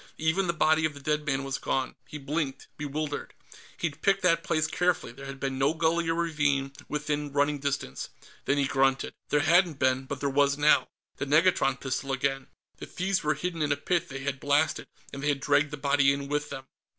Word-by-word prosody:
Even 160 Hz, +4 st, +1 dB
the -, -, +3 dB
body 160 Hz, -1 st, +3 dB
of 155 Hz, -2 st, 0 dB
the -, -, -9 dB
dead 150 Hz, +1 st, -1 dB
man 135 Hz, -1 st, 0 dB
was 135 Hz, 0 st, -3 dB
gone. 130 Hz, -1 st, -1 dB
He 150 Hz, -, -7 dB
blinked, 140 Hz, -1 st, -3 dB
bewildered. 150 Hz, 0 st, -4 dB, 0.4 s
He'd 160 Hz, -4 st, -3 dB
picked 195 Hz, 0 st, +2 dB
that 165 Hz, -2 st, +3 dB
place 155 Hz, -1 st, +1 dB
carefully; 175 Hz, -3 st, 0 dB
there 135 Hz, +3 st, -10 dB
had 135 Hz, 0 st, -7 dB
been 135 Hz, -1 st, -2 dB
no 140 Hz, +4 st, +2 dB
gully 165 Hz, +1 st, +1 dB
or 165 Hz, -, +1 dB
ravine 150 Hz, -5 st, 0 dB, 0.2 s
within 150 Hz, -1 st, -2 dB
running 145 Hz, +1 st, +1 dB
distance. 140 Hz, -, -3 dB, 0.4 s
Then 140 Hz, -, +2 dB
he 140 Hz, -, +2 dB
grunted. 135 Hz, 0 st, +1 dB, 0.2 s
There 150 Hz, -, +3 dB
hadn't 170 Hz, 0 st, +4 dB
been 130 Hz, -1 st, +1 dB
but 135 Hz, 0 st, -5 dB
there 140 Hz, -, -1 dB
was 140 Hz, 0 st, +2 dB
now. 150 Hz, +1 st, +4 dB, 0.3 s
The 140 Hz, -, -3 dB
negatron 150 Hz, -3 st, +3 dB
pistol 135 Hz, +1 st, -3 dB
again. 135 Hz, 0 st, -1 dB, 0.3 s
The -, -, -8 dB
thieves 190 Hz, +1 st, -1 dB
were 150 Hz, 0 st, +1 dB
hidden 170 Hz, +2 st, -3 dB
in 150 Hz, -1 st, +1 dB
a 145 Hz, -, +2 dB
pit 170 Hz, +3 st, -1 dB
they 135 Hz, -1 st, -6 dB
had 140 Hz, -1 st, -2 dB
blasted, 145 Hz, +3 st, +1 dB, 0.3 s
and 140 Hz, -, -6 dB
they 145 Hz, -, 0 dB
had 145 Hz, -1 st, +1 dB
dragged 145 Hz, +1 st, +2 dB
the 150 Hz, -, -6 dB
body 140 Hz, -1 st, +3 dB
in 140 Hz, 0 st, -3 dB
with 150 Hz, +1 st, -2 dB
them. 135 Hz, -, -6 dB
145 Hz, 210 wpm, -28 LUFS, 135-155 Hz, 0.4 s, hadn't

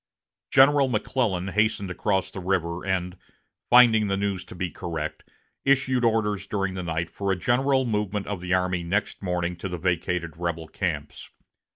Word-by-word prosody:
General 140 Hz, +1 st, +5 dB
McClellan 105 Hz, -5 st, -1 dB
hastened 105 Hz, -2 st, 0 dB
across 95 Hz, 0 st, -1 dB
the -, -, -6 dB
river, 90 Hz, -2 st, -1 dB
and, 90 Hz, -1 st, -1 dB, 0.5 s
finding 115 Hz, -4 st, +6 dB
the 95 Hz, 0 st, 0 dB
news 100 Hz, -2 st, -2 dB
to -, -, -11 dB
be 90 Hz, -1 st, -3 dB
correct, 80 Hz, -3 st, -5 dB, 0.4 s
issued 130 Hz, -2 st, +2 dB
orders 105 Hz, -4 st, +1 dB
during 100 Hz, -2 st, -1 dB
the 95 Hz, -, -4 dB
night 85 Hz, -1 st, -3 dB
for 100 Hz, -1 st, -2 dB
a -, -, +2 dB
general 130 Hz, +7 st, +2 dB
movement 105 Hz, -3 st, -1 dB
of 100 Hz, -4 st, -4 dB
the 90 Hz, 0 st, -5 dB
army 90 Hz, -1 st, +1 dB
next 100 Hz, +5 st, -2 dB
morning 90 Hz, -2 st, -1 dB
to 95 Hz, +3 st, -5 dB
the 90 Hz, -, -4 dB
vacated 85 Hz, -1 st, -1 dB
rebel 85 Hz, -2 st, -3 dB
camps. 75 Hz, -7 st, -4 dB
95 Hz, 165 wpm, -25 LUFS, 90-110 Hz, 0.5 s, finding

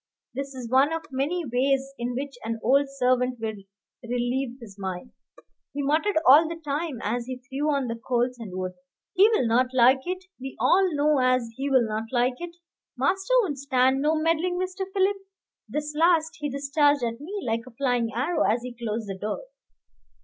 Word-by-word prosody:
This 275 Hz, +1 st, -5 dB
is 250 Hz, -2 st, -6 dB
one 270 Hz, +4 st, +4 dB
of 325 Hz, 0 st, -3 dB
many 300 Hz, +6 st, -1 dB
ways 270 Hz, +2 st, 0 dB
in 240 Hz, +1 st, -3 dB
which 275 Hz, +1 st, -4 dB
an 225 Hz, 0 st, -3 dB
old 275 Hz, +4 st, +3 dB
servant 250 Hz, -2 st, +1 dB
will 220 Hz, -1 st, -3 dB, 0.5 s
relieve 245 Hz, +1 st, -2 dB
his 215 Hz, -5 st, -12 dB
mind. 190 Hz, +4 st, -5 dB, 0.6 s
He 285 Hz, 0 st, -2 dB
muttered 315 Hz, +7 st, +1 dB
all 300 Hz, +5 st, +8 dB
the 335 Hz, -, -4 dB
time 300 Hz, -1 st, -3 dB
as 235 Hz, +3 st, -2 dB
he 255 Hz, -1 st, -4 dB
threw 270 Hz, +4 st, -3 dB
on 280 Hz, -2 st, 0 dB
the 230 Hz, -, -2 dB
coals 245 Hz, +1 st, -1 dB
and 195 Hz, -5 st, -7 dB
wood. 185 Hz, 0 st, -3 dB, 0.4 s
"He'll 405 Hz, -, +4 dB
not 240 Hz, +3 st, +3 dB
like 260 Hz, +4 st, +4 dB
it, 370 Hz, +1 st, -4 dB
we 265 Hz, +1 st, -7 dB
all 375 Hz, 0 st, +4 dB
know 290 Hz, 0 st, +3 dB
as 255 Hz, -2 st, +2 dB
he'll 265 Hz, -3 st, +2 dB
not 215 Hz, +1 st, -3 dB
like 250 Hz, +3 st, +1 dB
it. 345 Hz, -1 st, -7 dB, 0.4 s
Master 385 Hz, +4 st, 0 dB
won't 290 Hz, -9 st, -3 dB
stand 265 Hz, -1 st, +2 dB
no 305 Hz, +2 st, +2 dB
meddling, 330 Hz, +3 st, +1 dB
Mr. 375 Hz, +1 st, -4 dB
Philip," 390 Hz, +1 st, +2 dB, 0.5 s
this 300 Hz, 0 st, -3 dB
last 325 Hz, 0 st, +3 dB
he 295 Hz, -1 st, -2 dB
discharged 285 Hz, 0 st, +2 dB
at 230 Hz, +2 st, -3 dB
me 395 Hz, +7 st, -5 dB
like 230 Hz, +1 st, -2 dB
a -, -, -11 dB
flying 245 Hz, -3 st, 0 dB
arrow 270 Hz, +10 st, -1 dB
as 235 Hz, +3 st, +2 dB
he 250 Hz, -1 st, -6 dB
closed 225 Hz, -2 st, -4 dB
the 195 Hz, -, -4 dB
door. 215 Hz, -, -3 dB
270 Hz, 185 wpm, -26 LUFS, 245-305 Hz, 0.6 s, all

